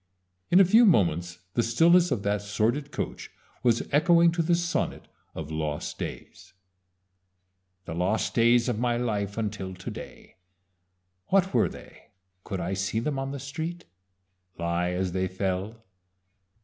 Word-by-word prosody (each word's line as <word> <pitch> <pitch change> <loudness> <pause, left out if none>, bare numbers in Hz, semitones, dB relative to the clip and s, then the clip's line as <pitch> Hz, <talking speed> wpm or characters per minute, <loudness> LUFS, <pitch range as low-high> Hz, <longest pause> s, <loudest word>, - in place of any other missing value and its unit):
In 180 - +6
a 195 - +8
few 220 +7 +6
moments 90 - +2 0.2
the 120 - +2
stillness 170 +10 +4
of 100 - -1
that 100 0 0
sordid 115 +8 -1
coach - - -5 0.3
was 115 -2 +2
echoing 170 +3 +5
to 170 0 0
the 170 +1 +2
sonnet 170 0 -2 0.3
of 80 -1 -6
"Lost 75 -1 -3
Days": - - -8 1.3
"The 80 - -5
lost 90 +6 0
days 120 +1 +4
of 120 -4 -1
my 120 -1 +1
life 105 -4 -2
until 100 -4 -3
to 95 - -7
day, - - -11 0.9
What 190 0 +2
were - - +3
they, - - -14 0.3
could 95 -3 -4
I 90 +2 -2
see 95 +3 -2
them 135 +3 -2
on 135 0 -3
the 140 0 -5
street 160 +6 -5 0.7
Lie 85 +1 -1
as 90 0 -1
they 95 +1 -1
fell? 95 +4 -3
115 Hz, 150 wpm, -27 LUFS, 95-150 Hz, 1.3 s, a